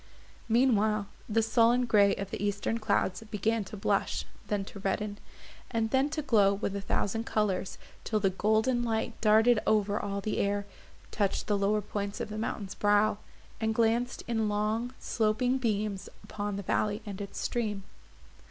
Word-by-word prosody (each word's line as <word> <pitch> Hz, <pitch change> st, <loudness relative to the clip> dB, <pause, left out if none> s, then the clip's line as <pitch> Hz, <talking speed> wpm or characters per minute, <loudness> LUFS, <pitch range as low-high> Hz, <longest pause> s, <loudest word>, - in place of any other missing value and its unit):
Meanwhile, 220 Hz, -3 st, +3 dB, 0.2 s
the 225 Hz, +1 st, +2 dB
sullen 235 Hz, +2 st, +3 dB
grey 205 Hz, -4 st, +4 dB
of 195 Hz, 0 st, -5 dB
the -, -, -4 dB
eastern 205 Hz, +3 st, -1 dB
clouds 200 Hz, -3 st, 0 dB
began 220 Hz, +1 st, 0 dB
to 210 Hz, +3 st, -8 dB
blush, 195 Hz, -, 0 dB, 0.2 s
then 205 Hz, -2 st, -1 dB
to 200 Hz, -, -10 dB
redden, 205 Hz, +1 st, -2 dB, 0.5 s
and 225 Hz, -2 st, -1 dB
then 265 Hz, +2 st, +3 dB
to 305 Hz, 0 st, -3 dB
glow 205 Hz, -7 st, +4 dB
with 200 Hz, -1 st, -3 dB
a 200 Hz, -, -3 dB
thousand 225 Hz, +3 st, -1 dB
colours, 200 Hz, -3 st, -1 dB, 0.3 s
till 215 Hz, -, 0 dB
the 195 Hz, -2 st, +2 dB
golden 220 Hz, +6 st, +2 dB
light 225 Hz, -2 st, -1 dB
darted 220 Hz, +2 st, +5 dB
over 210 Hz, -1 st, +2 dB
all 200 Hz, 0 st, -3 dB
the 210 Hz, +2 st, -2 dB
air, 200 Hz, 0 st, 0 dB, 0.5 s
touched 200 Hz, -2 st, 0 dB
the 210 Hz, -, +1 dB
lower 205 Hz, +1 st, +1 dB
points 200 Hz, 0 st, -4 dB
of -, -, -4 dB
the 215 Hz, 0 st, -5 dB
mountain's 205 Hz, -3 st, -3 dB
brow, 205 Hz, 0 st, +2 dB, 0.4 s
and 220 Hz, 0 st, 0 dB
glanced 235 Hz, +2 st, +1 dB
in 225 Hz, -2 st, 0 dB
long 215 Hz, +4 st, -1 dB
sloping 245 Hz, +4 st, 0 dB
beams 210 Hz, -4 st, -1 dB
upon 205 Hz, -1 st, -4 dB
the 200 Hz, -, -4 dB
valley 210 Hz, +3 st, 0 dB
and 205 Hz, -1 st, -6 dB
its 200 Hz, -1 st, -7 dB
stream. 210 Hz, -5 st, -2 dB
215 Hz, 165 wpm, -30 LUFS, 200-225 Hz, 0.5 s, darted